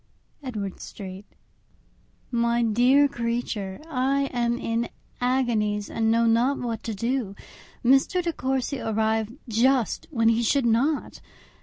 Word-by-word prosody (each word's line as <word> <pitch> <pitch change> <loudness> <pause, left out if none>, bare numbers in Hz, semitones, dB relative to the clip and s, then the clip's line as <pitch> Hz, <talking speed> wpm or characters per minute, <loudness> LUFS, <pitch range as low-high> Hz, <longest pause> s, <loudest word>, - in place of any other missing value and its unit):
_ - - -39 0.4
Edward 205 -6 -4
Street. 195 0 -9 1.0
My 235 0 +1
dear 250 +6 +4
Creature,—I 255 +3 -2
am 240 -1 0
in 230 -1 -2 0.3
agonies, 230 -5 0
and 225 -1 +1
know 230 +1 +3
not 235 +5 +3
what 230 -2 -3
to 225 -2 -3
do. 230 -1 -2 0.5
Mr. 270 +8 +4
De 340 -1 -1
Courcy 265 0 -2
arrived 220 +2 -1
just 245 +2 +1
when 230 -7 +2
he 230 +1 +2
should 255 +3 +2
not. 260 +7 +1
235 Hz, 125 wpm, -25 LUFS, 225-265 Hz, 1.0 s, dear